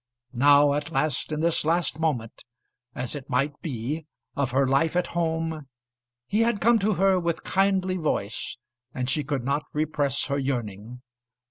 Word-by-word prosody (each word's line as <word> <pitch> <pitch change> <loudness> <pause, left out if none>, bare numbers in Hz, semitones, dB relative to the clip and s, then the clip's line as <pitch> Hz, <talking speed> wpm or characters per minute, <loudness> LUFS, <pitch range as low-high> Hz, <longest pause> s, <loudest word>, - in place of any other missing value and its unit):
Now 145 +3 +5
at 145 +1 -2
last, 150 -1 -1
in 150 0 -2
this 165 0 +2
last 165 -1 0
moment, 130 -9 -2 0.5
as 125 -1 -2
it 145 -3 -7
might 140 +4 0
be, 145 +3 -4 0.3
of 140 -2 0
her 135 +2 +2
life 140 +5 +2
at 180 - +2
home, 160 -3 -1 0.6
he 205 - 0
had 230 -2 +2
come 230 +2 +4
to 210 +1 +1
her 190 0 +3
with 170 -1 -2
kindly 190 -1 +1
voice, 130 - -2 0.4
and 125 -1 -2
she 145 +3 0
could 140 -2 -2
not 140 +3 0
repress 145 -2 0
her 140 0 -1
yearning. 120 -3 -4
150 Hz, 160 wpm, -26 LUFS, 135-170 Hz, 0.6 s, Now